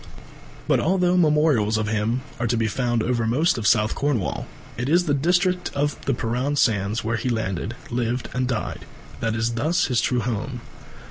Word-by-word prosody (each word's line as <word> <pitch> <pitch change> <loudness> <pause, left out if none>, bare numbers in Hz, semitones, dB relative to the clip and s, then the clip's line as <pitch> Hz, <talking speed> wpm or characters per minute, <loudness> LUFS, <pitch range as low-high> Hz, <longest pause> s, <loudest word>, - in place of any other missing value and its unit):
But - - +3
although 180 +1 +2
memorials 150 -10 +3
of 110 -1 -1
him 110 +3 0 0.2
are 120 - 0
to 115 +1 +1
be 115 - +1
found 120 +1 0
over 120 -2 0
most 135 +4 +2
of 105 - 0
South 105 -2 +3
Cornwall, 140 -9 -1 0.3
it 125 +3 -3
is 175 +3 +3
the 145 - +1
district 180 +5 +1
of 145 +1 -1
the 135 - +1
Perran 125 +5 -1
Sands, 105 -2 +1
where 115 +1 -1
he 125 - -2
landed, 110 -1 -2 0.2
lived 120 +1 -1
and 125 0 0
died, 115 -8 -3 0.3
that 115 0 -1
is 115 +1 0 0.3
his 125 -4 +1
true 125 -1 +1
home. 120 +2 -3
120 Hz, 180 wpm, -23 LUFS, 110-145 Hz, 0.3 s, But